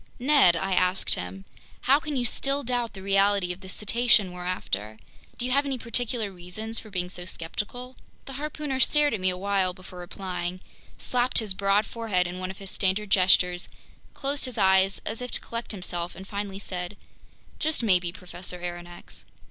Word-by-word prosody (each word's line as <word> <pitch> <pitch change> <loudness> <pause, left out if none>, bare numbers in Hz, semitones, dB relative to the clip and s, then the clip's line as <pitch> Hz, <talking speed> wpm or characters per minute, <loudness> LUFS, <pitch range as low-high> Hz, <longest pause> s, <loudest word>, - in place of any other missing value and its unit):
"Ned," 260 - +6
I 190 +3 0
asked 185 +1 +2
him, 95 +2 -5 0.4
"how 275 +3 +5
can 305 -2 -4
you 250 -2 0
still 275 +3 0
doubt 240 -1 -1
the 190 - -9
reality 195 -2 +3
of 180 - -13
this 190 -1 -6
cetacean 215 -2 +4
we're 180 0 -7
after? 110 - -3 0.4
Do 245 - 0
you 255 - -1
have 280 +2 +4
any 275 -2 -2
particular 235 -2 0
reasons 190 +5 -4
for 220 - -12
being 180 -3 -2
so 180 0 -6
skeptical?" 210 +9 -4 0.3
The 270 - -8
harpooner 295 -1 -3
stared 295 +2 +4
at 215 - -1
me 185 0 +3
awhile 185 0 +1
before 185 -1 -11
replying, 180 0 -4 0.4
slapped 250 0 +1
his 215 -4 +4
broad 200 +2 +2
forehead 210 -5 0
in 175 +1 -5
one 185 0 -3
of 190 - -7
his 195 -1 -6
standard 195 +1 0
gestures, 180 -1 +4 0.5
closed 280 +1 -1
his 255 -3 -4
eyes 190 0 +4
as 220 +3 -4
if 250 - -4
to - - +1
collect 235 0 -5
himself, 175 -3 -3
and 190 - -10
finally 200 -1 -4
said: 185 0 -5 0.6
"Just 310 -5 0
maybe, 180 -5 +3
Professor 180 0 -7
Aronnax." 175 0 -7
195 Hz, 180 wpm, -27 LUFS, 180-240 Hz, 0.6 s, Ned